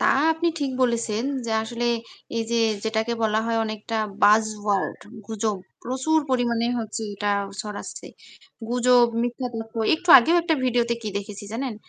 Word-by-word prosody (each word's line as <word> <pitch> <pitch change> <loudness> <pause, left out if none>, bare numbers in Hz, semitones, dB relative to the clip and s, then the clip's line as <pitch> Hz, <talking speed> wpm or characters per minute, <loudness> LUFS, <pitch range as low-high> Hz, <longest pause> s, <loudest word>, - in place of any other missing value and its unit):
তা - - +3 0.3
আপনি 330 +2 0
ঠিক 280 -2 0
বলেছেন 230 -2 0 0.2
যে 225 - -2
আসলে 235 +2 -3 0.5
এইযে 230 +1 -1 0.2
যেটাকে 220 +1 -1
বলা 220 0 +2
হয় 230 0 0
অনেকটা 220 +1 -4 0.3
বায 210 +2 +6 0.2
ওয়ার্ড 205 -2 -1 0.3
গুজব। 220 -1 -2 0.3
প্রচুর 265 +6 +1
পরিমাণে 235 -2 +1
হচ্ছে 225 -1 -4
এটা 205 +1 -1 0.3
ছড়াচ্ছে। 210 0 -7 0.6
গুজব, 245 0 +4 0.2
মিথ্যা 245 +2 -2
তথ্য 225 0 -7 0.2
একটু 355 +2 -9
আগেও 325 +9 +3
একটা 330 -1 +1
ভিডিও 245 -1 +2
তে 235 - +3
কি 215 - -3
দেখেছি 205 0 -8
জানেন? 250 0 -3
230 Hz, 150 wpm, -24 LUFS, 220-250 Hz, 0.6 s, বায